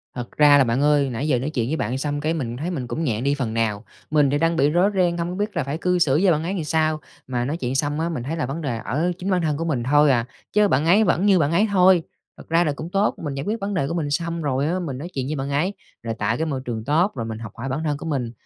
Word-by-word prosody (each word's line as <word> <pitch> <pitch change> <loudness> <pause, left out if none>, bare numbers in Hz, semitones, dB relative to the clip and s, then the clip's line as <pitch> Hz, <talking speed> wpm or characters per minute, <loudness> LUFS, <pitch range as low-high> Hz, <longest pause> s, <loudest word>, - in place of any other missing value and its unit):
Thật 120 -2 -6
ra 145 -1 +7
là 140 - +5
bạn 120 +2 0
ơi, 145 -2 +3
nãy 125 +5 -3
giờ 130 -5 +2
nói 135 +5 -2
chuyện 120 -6 -2
với 155 - 0
bạn 125 +1 -2
xong 145 +1 -2
cái 155 +2 0
mình 120 -7 -3
thấy 165 +7 -3
mình 130 -8 -4
cũng 160 - -3
nhẹ 120 -6 -1
đi 140 +2 +1
phần 125 -6 -3
nào. 110 -2 -1 0.3
Mình 150 -2 +4
thì 145 - +1
đang 165 +2 +1
bị 145 -3 +3
rối 175 +6 +3
ren, 175 -2 +2
không 170 0 -2
có 180 - -4
biết 205 0 -3
là 165 - 0
phải 140 +3 -3
cư 180 +1 +1
xử 145 -2 +3
với 190 - +5
bạn 155 -1 +1
ấy 180 +4 -2
làm 180 -5 -2
sao, 155 0 +1 0.3
mà 125 -1 -1
nói 150 +5 -2
chuyện 130 -4 -3
xong 145 +2 0
á, 165 +1 0
mình 145 -8 -4
thấy 155 +5 -3
là 150 - -1
vấn 145 +6 -4
đề 125 -6 -2
ở 150 +10 -1
chính 185 +1 -4
bản 185 -2 +2
thân 155 -3 0
của 165 - -3
mình 135 -8 -1
thôi 145 +2 +4
à, 120 -2 +1 0.3
chớ 210 0 +4
bạn 150 -4 +1
ấy 195 +6 +5
vẫn 185 -1 +2
như 195 -3 +5
bạn 150 -1 +1
ấy 200 +6 +3
thôi. 185 -2 +5 0.3
Thật - - -14
ra 165 +1 +4
là 150 - 0
cũng 155 +3 -6
tốt, 200 +2 +1
mình 145 -2 -3
giải 140 - -4
quyết 220 +2 -2
vấn 200 +1 -3
đề 140 -7 0
của - - -3
mình 160 -4 -2
xong 170 +2 -2
rồi 140 -1 0
á, 180 +3 0
mình 145 -8 -4
nói 170 +6 -6
chuyện 135 -1 -3
với 150 - -2
bạn 135 0 -3
ấy, 160 +8 0 0.3
là 115 -1 -2
tại 110 +3 0
cái 160 - -1
môi 135 -4 -3
trường 115 -3 -4
tốt, 170 +7 +2
rồi 115 -3 -3
mình 110 -1 -5
học 115 -3 -8
hỏi 120 +4 -5
bản 140 +5 -2
thân 145 -2 -1
của - - -8
mình, 135 -7 -2
150 Hz, 325 wpm, -22 LUFS, 130-170 Hz, 0.3 s, ra